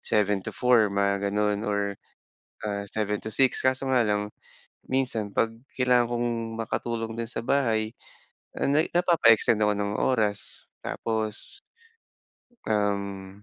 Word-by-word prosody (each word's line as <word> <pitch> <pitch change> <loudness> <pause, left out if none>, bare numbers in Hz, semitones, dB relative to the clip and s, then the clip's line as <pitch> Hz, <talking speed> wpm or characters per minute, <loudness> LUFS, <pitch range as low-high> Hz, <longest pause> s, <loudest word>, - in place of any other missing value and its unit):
7 105 -2 +2
to - - -5
4 120 -4 +4
mga 100 0 0
ganon 105 +1 0
or 100 -1 -1 0.7
ah, 100 -1 -2
7 105 -1 -1
to 110 - -5
6, 130 +2 +3
kaso 130 +1 +1
nga 130 -3 +3
lang 105 -1 0 0.6
minsan, 125 -6 -1
'pag 115 +3 +1 0.2
kailangan 125 -2 +3
kong 120 0 0 0.3
makatulong 115 0 -3
din 115 -1 -3
sa - - -3
bahay, 115 -5 +1 0.7
ah - - 0
na 145 +3 +3
napapa-extend 160 - +4
ako 105 - +3
ng 100 0 -1
oras. 110 -5 -1 0.2
Tapos 110 - -3 1.1
uhm, 100 -2 -2
110 Hz, 130 wpm, -26 LUFS, 105-120 Hz, 1.1 s, 4